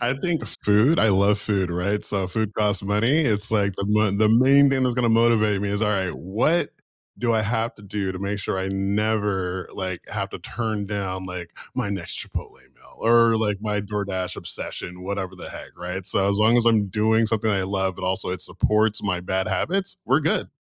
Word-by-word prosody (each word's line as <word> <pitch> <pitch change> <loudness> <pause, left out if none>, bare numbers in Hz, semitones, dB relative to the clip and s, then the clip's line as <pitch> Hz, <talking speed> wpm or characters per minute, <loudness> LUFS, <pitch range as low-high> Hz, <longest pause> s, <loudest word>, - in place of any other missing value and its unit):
I 125 +2 +1
think 175 -3 0 0.2
food; 110 +10 +4
I 110 - +4
love 100 +1 +3
food, 95 -4 -1
right? 100 +4 -1
So 95 -2 -1
food 110 +1 -2
costs 105 -3 +1
money. 105 +9 +2
It's 105 -6 0
like, 100 -3 +1
the 100 - -2
mo 105 -1 +2
the 105 +2 +3
main 135 +5 +6
thing 135 -1 +2
that's 125 -1 +1
gonna 120 -1 +1
motivate 110 -3 +3
me 100 0 -2
is, 100 +2 -1
"Alright, 95 -4 0
what 115 - 0 0.5
do 120 -1 +1
I 110 -1 +2
have 115 +2 -1
to 105 - -15
do 100 -1 -3
to 95 - -6
make 100 +1 -3
sure 95 - -2
I 95 - -2
never, 95 -2 -1
like, 95 -2 -4
have - - -3
to - - -7
turn 110 -3 -3
down, 95 -2 -3
like, 90 -2 -6 0.2
my 100 - -1
next 95 -4 -3
Chipotle - - -6 0.2
meal - - -19
or, 115 0 +4
like, 105 -2 0
my 105 -1 -1
DoorDash 100 -3 -3
obsession," 90 +1 -6
whatever 95 -1 -4
the 90 - -8
heck, - - -8
right? 90 +1 -5
So 100 0 +2
as 100 - +1
long 110 +3 +4
as 120 - +3
I'm 110 -3 +3
doing 110 +3 +2
something 110 0 0
I 100 -2 +1
love, 95 -1 -1
but - - -6
also 95 0 0
it 90 - -3
supports 105 0 +1
my 95 -3 -1
bad 95 +2 -2
habits, 180 - -1
we're - - +3
good. - - +1
105 Hz, 210 wpm, -23 LUFS, 95-110 Hz, 0.5 s, main